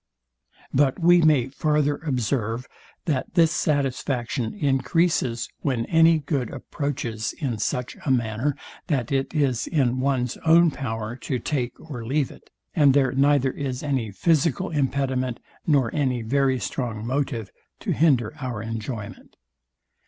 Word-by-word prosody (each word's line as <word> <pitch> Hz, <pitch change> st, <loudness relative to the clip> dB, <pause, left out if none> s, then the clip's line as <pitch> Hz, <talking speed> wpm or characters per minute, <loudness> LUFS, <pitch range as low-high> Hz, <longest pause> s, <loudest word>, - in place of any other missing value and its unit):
But 135 Hz, -1 st, +3 dB
we 175 Hz, 0 st, +5 dB
may 145 Hz, -6 st, +4 dB
farther 145 Hz, 0 st, +1 dB
observe, 125 Hz, -4 st, -1 dB, 0.4 s
that 145 Hz, 0 st, -2 dB
this 165 Hz, -3 st, +5 dB
satisfaction 135 Hz, -, -1 dB
encreases, 135 Hz, -, +1 dB
when 125 Hz, -5 st, -1 dB
any 165 Hz, 0 st, +5 dB
good 140 Hz, -5 st, -2 dB
approaches 120 Hz, -6 st, -3 dB
in 125 Hz, -8 st, -3 dB
such 125 Hz, +3 st, -2 dB
a -, -, -2 dB
manner 120 Hz, +2 st, +1 dB, 0.3 s
that 135 Hz, -8 st, -1 dB
it 135 Hz, -1 st, 0 dB
is 135 Hz, -6 st, +1 dB
in 130 Hz, -5 st, +1 dB
one's 130 Hz, -2 st, 0 dB
own 165 Hz, +1 st, +5 dB
power 110 Hz, -4 st, -4 dB
to 130 Hz, 0 st, -2 dB
take 125 Hz, -1 st, -3 dB
or 135 Hz, -7 st, -7 dB
leave 135 Hz, +4 st, 0 dB
it, -, -, -16 dB, 0.2 s
and 145 Hz, -4 st, +5 dB
there 135 Hz, -3 st, +3 dB
neither 135 Hz, 0 st, +3 dB
is 130 Hz, -2 st, -4 dB
any 135 Hz, -6 st, -1 dB
physical 155 Hz, -, +1 dB
impediment, 130 Hz, -4 st, 0 dB, 0.3 s
nor 140 Hz, -7 st, +3 dB
any 130 Hz, -5 st, 0 dB
very 135 Hz, +2 st, +2 dB
strong 110 Hz, +2 st, -3 dB
motive 125 Hz, -5 st, -2 dB, 0.3 s
to -, -, -2 dB
hinder 135 Hz, -8 st, +3 dB
our 125 Hz, -5 st, -4 dB
enjoyment. 115 Hz, -1 st, -6 dB
135 Hz, 135 wpm, -24 LUFS, 120-145 Hz, 0.4 s, we